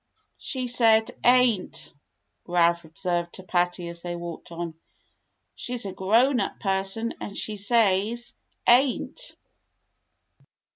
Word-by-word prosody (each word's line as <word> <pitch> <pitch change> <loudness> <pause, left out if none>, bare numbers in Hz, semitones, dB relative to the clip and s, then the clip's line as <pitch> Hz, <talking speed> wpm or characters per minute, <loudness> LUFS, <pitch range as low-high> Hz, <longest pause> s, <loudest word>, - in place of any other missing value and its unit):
She 260 -3 -4
said 225 -2 +4
'ain't,'" 245 -6 +3 0.5
Ralph 170 -1 +2
observed 175 +1 -2
to 190 - -10
Patty 175 -1 0
as 170 0 -6
they 175 0 -4
walked 170 0 -8
on. 170 -1 -5 0.8
"She's 245 -3 -4
a 195 - -3
grown 230 +8 +3
up 195 - -3
person 195 +3 0
and 200 - -6
she 215 - -2
says 215 +2 +1 0.2
* - - -20
ain't.'" 265 - +2
195 Hz, 115 wpm, -26 LUFS, 175-235 Hz, 0.8 s, said